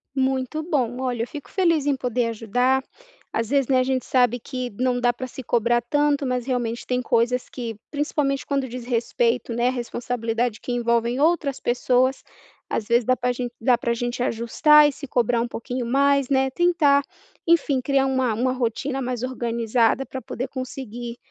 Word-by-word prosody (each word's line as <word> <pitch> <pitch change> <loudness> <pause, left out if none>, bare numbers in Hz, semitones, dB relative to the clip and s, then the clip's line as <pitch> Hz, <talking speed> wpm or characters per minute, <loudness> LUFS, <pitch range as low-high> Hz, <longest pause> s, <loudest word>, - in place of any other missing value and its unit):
Muito 265 +3 0
bom, 255 -7 -1
olha, 250 -3 -1
eu - - -2
fico 295 -3 -9
feliz 335 -6 +2
em 285 - +3
poder 250 -2 -1
ajudar. 245 +4 +1 0.5
Às 225 -1 -1
vezes, 275 -3 +2
né, 265 -2 +3
a - - +4
gente 260 0 -1
sabe 245 -2 +2
que 255 0 -5
não 250 +3 -1
dá 245 0 +3
para 255 +2 -6
se 260 - -9
cobrar 240 +1 +2
tanto, 290 0 +2
mas 250 -1 -1
realmente 240 -3 -2
tem 250 0 -1
coisas 245 +1 +1
que, 230 -4 -6 0.2
principalmente 290 -2 -1
quando 275 -2 -1
diz 245 0 -7
respeito, 235 0 0
né, 240 +1 +2
à - - +2
responsabilidade 240 -2 -2
que 245 - -4
envolvem 235 +1 +1
outras 305 -3 +1
pessoas, 250 +2 +1 0.4
às 215 - -2
vezes, 235 0 +3
dá 255 +3 +2
para 250 0 0
gente 245 -1 -4
dá 240 +1 +3
para 235 - 0
gente 240 +1 -3
ajustar 295 +6 +4
e - - -2
se 280 - -9
cobrar 240 -2 +1
um - - -1
pouquinho 245 +1 -4
mais, 280 +1 +2
né. 265 -1 +2
Tentar, 300 -3 +3 0.4
enfim, 330 -5 +3
criar 270 +1 +2
uma 260 -3 +1
uma 250 +4 0
rotina 260 +2 -2
mais 250 -2 -3
organizada 235 0 0
para 265 - -7
poder 255 0 -5
conseguir, 245 -3 -6
250 Hz, 185 wpm, -23 LUFS, 235-270 Hz, 0.5 s, a